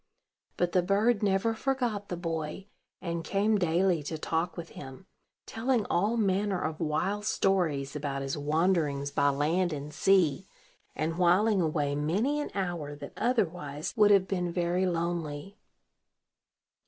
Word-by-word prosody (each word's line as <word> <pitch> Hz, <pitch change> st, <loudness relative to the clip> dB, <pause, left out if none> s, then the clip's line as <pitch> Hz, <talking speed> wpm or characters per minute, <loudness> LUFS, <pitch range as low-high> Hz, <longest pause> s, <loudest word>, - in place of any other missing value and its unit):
But 175 Hz, 0 st, +1 dB
the 180 Hz, -, +3 dB
bird 205 Hz, +5 st, +2 dB
never 200 Hz, +2 st, +2 dB
forgot 235 Hz, -4 st, -2 dB
the 175 Hz, -, -3 dB
boy, 165 Hz, +1 st, -4 dB, 0.4 s
and 170 Hz, -2 st, -3 dB
came 205 Hz, +3 st, +1 dB
daily 175 Hz, -1 st, +2 dB
to 155 Hz, +2 st, -5 dB
talk 165 Hz, +3 st, -2 dB
with 170 Hz, -1 st, -6 dB
him, 135 Hz, +8 st, -10 dB, 0.4 s
telling 230 Hz, -1 st, 0 dB
all 205 Hz, +7 st, +1 dB
manner 195 Hz, -2 st, +1 dB
of 155 Hz, -1 st, -3 dB
wild 175 Hz, +6 st, -1 dB
stories 160 Hz, -10 st, 0 dB
about 140 Hz, -2 st, -3 dB
his 135 Hz, 0 st, -2 dB
wanderings 150 Hz, -2 st, 0 dB
by 140 Hz, 0 st, +3 dB
land 160 Hz, +6 st, +1 dB
and 150 Hz, 0 st, -6 dB
sea, 175 Hz, -3 st, +2 dB, 0.5 s
and 160 Hz, +4 st, -2 dB
whiling 190 Hz, +3 st, +4 dB
away 150 Hz, -3 st, 0 dB
many 200 Hz, -, 0 dB
an -, -, -4 dB
hour 175 Hz, -7 st, -3 dB
that 145 Hz, -, -9 dB
otherwise 170 Hz, -, -1 dB
would 210 Hz, -3 st, +5 dB
have 195 Hz, -2 st, +5 dB
been 180 Hz, -3 st, -1 dB
very 175 Hz, +2 st, 0 dB
lonely. 170 Hz, 0 st, -3 dB
175 Hz, 140 wpm, -29 LUFS, 155-195 Hz, 0.5 s, would